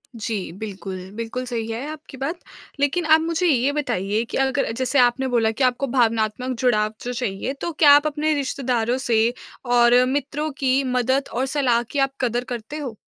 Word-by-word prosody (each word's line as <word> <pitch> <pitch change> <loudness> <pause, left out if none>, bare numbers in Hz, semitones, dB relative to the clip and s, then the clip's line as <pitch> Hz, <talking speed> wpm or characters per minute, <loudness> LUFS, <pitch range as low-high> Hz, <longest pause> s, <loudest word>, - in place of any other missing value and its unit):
जी। 220 -4 -4
बिल्कुल, 195 0 -7 0.2
बिल्कुल 230 +3 -4
सही 235 -3 -3
है 230 +5 -4
आपकी 305 -3 -11
बात। 300 +7 -3 0.4
लेकिन 285 +5 +1
आप 315 0 +5
मुझे 335 +2 0
ये 270 -3 +3
बताइए 215 -7 -1
कि - - -3
अगर 270 -2 +1
जैसे 260 +2 +1
आपने 245 +2 +3
बोला 230 -3 +2
कि 225 +5 -2
आपको 255 +2 +1
भावनात्मक 235 0 0
जुड़ाव 215 -4 +2
जो 245 - -3
चाहिए, 235 0 -3
तो 315 +5 -4
क्या 300 -2 +6
आप 290 +1 +6
अपने 305 +1 0
रिश्तेदारों 255 -4 -1
से 230 0 +3 0.4
और 240 +1 +6
मित्रों 285 +3 -2
की 270 0 +2
मदद 260 +1 0
और 255 +3 0
सलाह 260 -4 +1
की 285 - -1
आप 270 0 +1
कदर 245 -1 0
करते 245 +4 -5
हो? 265 -7 -6
255 Hz, 185 wpm, -22 LUFS, 230-280 Hz, 0.4 s, क्या